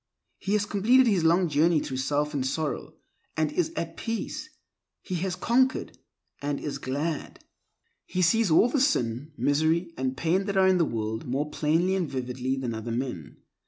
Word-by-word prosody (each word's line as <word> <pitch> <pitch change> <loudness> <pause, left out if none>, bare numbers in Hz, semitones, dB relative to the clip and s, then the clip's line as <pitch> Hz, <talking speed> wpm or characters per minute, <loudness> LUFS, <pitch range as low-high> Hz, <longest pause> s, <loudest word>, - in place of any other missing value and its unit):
He 200 - -2
has 210 -1 +2
completed 235 +6 +4
his 200 -7 +2
long 170 +3 +4
journey 160 +2 +3
through 135 -3 -4
self 145 +3 0
and 140 -3 -1
sorrow, 145 +3 -3 0.4
and 155 -1 +1
is 165 +1 0
at 165 0 -4
peace. 230 +6 -4 0.5
He 185 - -6
has 180 +1 -2
conquered, 255 +7 +1 0.5
and 145 0 -2
is 145 - -4
glad. 145 +4 -4 0.6
He 185 - 0
sees 225 +4 +3
all 160 +8 +5
the 260 +2 0
sin, 130 - 0
misery, 160 +4 +1
and 130 0 -2
pain 180 +4 +1
that 200 -1 -2
are 190 0 +5
in 185 -1 +4
the 165 - +4
world 110 -2 -3
more 140 +4 -2
plainly 165 +5 +1
and 180 -5 -1
vividly 130 0 -2
than 125 -3 -3
other 110 +1 -5
men. 115 - -4
160 Hz, 175 wpm, -27 LUFS, 135-190 Hz, 0.6 s, all